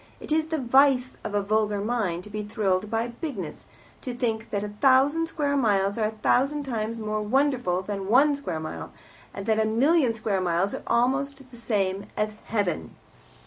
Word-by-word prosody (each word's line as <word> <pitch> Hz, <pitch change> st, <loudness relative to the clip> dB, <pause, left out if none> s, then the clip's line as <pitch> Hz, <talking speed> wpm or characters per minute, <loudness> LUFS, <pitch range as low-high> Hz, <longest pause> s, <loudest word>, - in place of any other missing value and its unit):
It -, -, -9 dB
is 315 Hz, 0 st, +2 dB
the 320 Hz, 0 st, -1 dB
vice 260 Hz, 0 st, +3 dB
of 210 Hz, -1 st, -4 dB
a 205 Hz, -, +1 dB
vulgar 210 Hz, 0 st, +1 dB
mind 200 Hz, -5 st, -1 dB
to 210 Hz, -, -11 dB
be 215 Hz, 0 st, -3 dB
thrilled 205 Hz, -2 st, -1 dB
by 225 Hz, +2 st, -1 dB
bigness, 235 Hz, -, -6 dB, 0.3 s
to 250 Hz, -2 st, -5 dB
think 230 Hz, -2 st, -2 dB
that 200 Hz, 0 st, -2 dB
a 210 Hz, -, -4 dB
thousand 280 Hz, +5 st, +4 dB
square 290 Hz, -3 st, -1 dB
miles 200 Hz, -6 st, +2 dB
are 220 Hz, -, 0 dB
a 220 Hz, 0 st, -7 dB
thousand 285 Hz, +3 st, +2 dB
times 230 Hz, -3 st, -3 dB
more 215 Hz, -1 st, -2 dB
wonderful 245 Hz, -6 st, +1 dB
than 195 Hz, -1 st, -4 dB
one 280 Hz, +5 st, +5 dB
square 280 Hz, -, -4 dB
mile, 155 Hz, 0 st, -6 dB, 0.4 s
and 200 Hz, -, -7 dB
that 220 Hz, 0 st, +2 dB
a 220 Hz, -, +3 dB
million 260 Hz, +5 st, +3 dB
square 210 Hz, -3 st, -1 dB
miles 180 Hz, +2 st, 0 dB
are -, -, -4 dB
almost 270 Hz, +2 st, 0 dB
the -, -, -12 dB
same 200 Hz, -4 st, -1 dB
as 215 Hz, 0 st, 0 dB
heaven. 185 Hz, -, -2 dB
225 Hz, 185 wpm, -26 LUFS, 205-265 Hz, 0.4 s, one